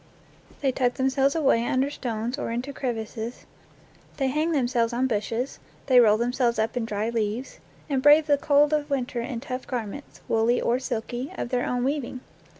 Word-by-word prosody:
They 270 -2 +2
tuck 250 -1 0
themselves 270 +2 +2
away 275 -7 +3
under 260 +3 0
stones 240 0 -3
or - - -3
into 245 +4 -3
crevices, 230 -2 -4 0.7
they 270 -2 +1
hang 305 +5 0
themselves 245 -5 +1
on 250 +2 +1
bushes, 230 +2 -2 0.3
they 255 -2 +6
roll 215 -3 +6
themselves 240 0 +1
up 220 +2 0
in 245 -2 -1
dry 215 +1 -2
leaves, 225 +2 -3 0.3
and 275 -3 0
brave 295 +2 +7
the 290 -2 +3
cold 290 +1 +4
of 300 -1 0
winter 255 -3 -1
in 235 -1 -4
tough 255 -1 -5
garments, 245 +2 -6
woolly 225 +2 +2
or 240 +2 +1
silky, 245 0 -4
of - - -3
their 250 0 0
own 245 0 -1
weaving. 265 -2 -2
250 Hz, 175 wpm, -25 LUFS, 235-275 Hz, 0.7 s, brave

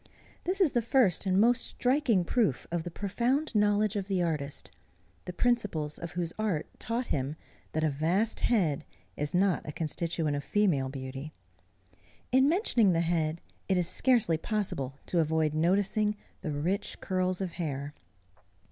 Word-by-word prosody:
This 375 +3 -1
is 360 -7 +4
the 240 - +1
first 225 -6 +2
and 190 0 +3
most 235 +3 +4
striking 250 - +2
proof 210 - +1
of 170 -1 0
the 175 - -5
profound 240 - -1
knowledge 210 -1 +2
of 195 -2 -2
the 195 -2 0
artist, 150 -4 -3 0.5
the - - -4
principles 185 -9 0
of 170 -1 -6
whose 170 -2 -2
art 200 -8 0
taught 235 +2 -2
him 140 +1 -2 0.4
that 155 - 0
a 155 - +3
vast 175 +10 0
head 165 - +1 0.3
is 145 +3 -2
not 190 -1 +3
a - - -6
constituent 160 0 -1
of 145 - -3
female 165 -11 +1
beauty. 135 +2 -7 1.0
In 265 +2 +5
mentioning 250 - +3
the 165 - +2
head 165 -1 0 0.3
it 190 - +3
is 175 -2 +1
scarcely 205 -4 +3
possible 155 - -2
to 175 - 0
avoid 160 -1 +1
noticing 200 +6 +2 0.3
the 175 - -4
rich 165 +7 -2
curls 185 -1 -1
of 190 -3 -3
hair. 145 -4 -4
180 Hz, 155 wpm, -29 LUFS, 155-215 Hz, 1.0 s, In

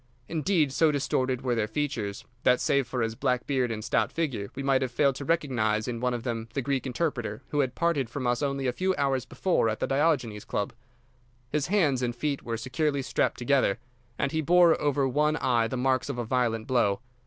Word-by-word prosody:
Indeed, 160 -3 +1
so 160 +2 +4
distorted 130 -2 0
were 125 -2 +1
their 110 -2 0
features 110 -5 -3 0.2
that, 125 0 +4
save 140 -3 +1
for 125 -2 -1
his 115 0 -1
black 125 +1 -1
beard 130 -3 0
and 110 -1 -4
stout 115 +1 +1
figure, 130 -12 -2
we 135 - -4
might 135 -1 +3
have 130 - 0
failed 135 +3 +2
to 140 - -6
recognise 120 -10 0
in 120 -2 -3
one 125 0 0
of 120 - -5
them 115 -2 -3
the 140 - +1
Greek 135 -1 -1
interpreter 125 -6 -2
who 145 - -1
had 130 -3 0
parted 165 -8 0
from 130 +1 -4
us 120 +1 +1
only 140 -1 -1
a 125 - +1
few 185 +6 0
hours 135 -2 0
before 180 -11 +1
at 110 - -3
the - - 0
Diogenes 135 -8 +1
Club. 100 - -3 0.8
His 150 -1 0
hands 160 -10 +2
and 120 -1 -1
feet 140 +2 -2
were 115 -1 -3
securely 135 +4 -1
strapped - - 0
together, 125 -5 +2 0.4
and 140 - 0
he 160 - 0
bore 170 +1 +5
over 145 -2 +2
one 150 +3 +2
eye 120 -6 +1
the 130 - -4
marks 130 +2 +1
of 140 - -3
a 120 - -2
violent 115 -2 0
blow. 120 -7 +2
130 Hz, 215 wpm, -27 LUFS, 120-145 Hz, 0.8 s, bore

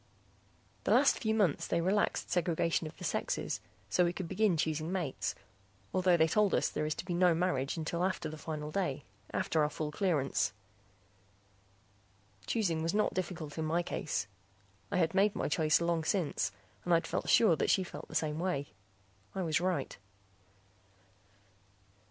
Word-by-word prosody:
The - - -2
last - - +5
few 220 -1 0
months 195 -9 +2
they 170 - +1
relaxed 190 +5 0
segregation 170 -1 +1
of 155 - -11
the - - -10
sexes - - -2 0.3
so 180 - +3
we 175 0 +1
could 185 -1 -4
begin 205 -2 +2
choosing 155 +1 -1
mates, 175 -8 -2 0.6
although 185 -1 +4
they 160 0 +4
told 210 +3 +3
us - - +2
there 150 - -2
is 155 - -1
to - - -6
be 180 - -3
no 175 -1 +4
marriage 160 -5 0
until 165 +2 -2
after 185 0 -1
the 155 - -6
final 150 -1 -5
day, 175 -7 -1 0.3
after 160 - +1
our 150 - +2
full 150 0 -4
clearance. 140 - +1 1.9
Choosing 175 -8 0
was 165 +4 -1
not 210 - +2
difficult 170 -5 -4
in 160 - -1
my 165 +3 +1
case. 155 - -2 0.7
I - - +1
had 165 -1 +2
made 200 +2 +3
my - - -1
choice 155 0 +3
long 170 -1 0
since 160 - 0 0.3
and 175 -1 +3
I'd 165 0 +1
felt - - -2
sure 215 -8 +6
that - - 0
she 190 - +4
felt 180 - -9
the - - -10
same 155 0 0
way; 170 -6 -1 0.7
I 190 - -1
was 160 -1 +1
right. 180 -7 -1
170 Hz, 170 wpm, -32 LUFS, 155-185 Hz, 1.9 s, sure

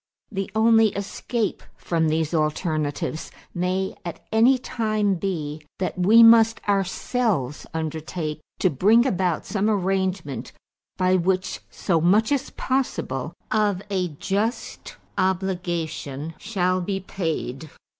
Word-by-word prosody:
The 195 -2 -3
only 225 0 +5
escape 205 +2 -2 0.2
from 160 -2 0
these 160 +1 0
alternatives 155 -1 -1 0.2
may 185 +2 -1
at 170 -2 -7
any 235 +4 +5
time 215 -4 0
be 160 -5 -3 0.2
that 185 - -2
we 210 +6 +6
must 225 -1 +7
ourselves 195 - 0
undertake 160 0 -4 0.2
to 185 - +3
bring 210 - +4
about 180 -8 0
some 210 0 0
arrangement 190 -6 -1 0.4
by 185 0 +3
which 185 +1 0
so 170 -5 0
much 205 - +3
as 280 -3 0
possible 170 - -2 0.2
of 205 -3 +1
a 185 -2 +1
just 200 - -3 0.2
obligation 175 -5 -2
shall 185 -4 0
be 195 +2 -2
paid." 160 -6 -4
185 Hz, 115 wpm, -24 LUFS, 160-210 Hz, 0.4 s, must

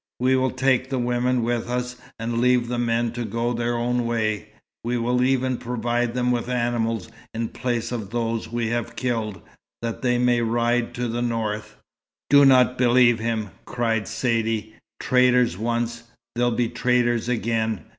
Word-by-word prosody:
"We 130 +1 +3
will 130 0 +2
take 130 0 +1
the 135 - -1
women 125 0 +1
with 120 0 -1
us, 125 0 -2 0.2
and 115 +1 -2
leave 125 -1 +3
the 120 -1 -1
men 115 -1 0
to 120 +1 -4
go 115 +2 -1
their 120 0 -1
own 120 0 0
way. 110 -2 -1 0.4
We 120 +1 -1
will 125 +1 +1
even 130 -1 +1
provide 120 0 -1
them 125 0 +1
with 120 0 -1
animals 120 -2 -1 0.3
in 115 0 -2
place 120 -2 -2
of 110 -5 -4
those 115 0 -2
we 120 -1 -1
have 120 0 -3
killed, 115 -6 -2 0.4
that 115 -1 -3
they 125 -1 +2
may 120 -1 +2
ride 120 +1 0
to 125 0 -2
the 120 +1 -2
north." 110 -3 -2 0.6
"Do 140 0 +8
not 125 -2 +5
believe 120 -1 +5
him!" 110 -2 -2 0.2
cried 115 -3 -1
Saidee. 115 -2 -1 0.3
"Traitors 125 -4 +3
once, 115 +2 -2 0.3
they'll 120 +1 +1
be 120 0 0
traitors 120 -1 +1
again. 110 -5 -1
120 Hz, 165 wpm, -23 LUFS, 115-125 Hz, 0.6 s, Do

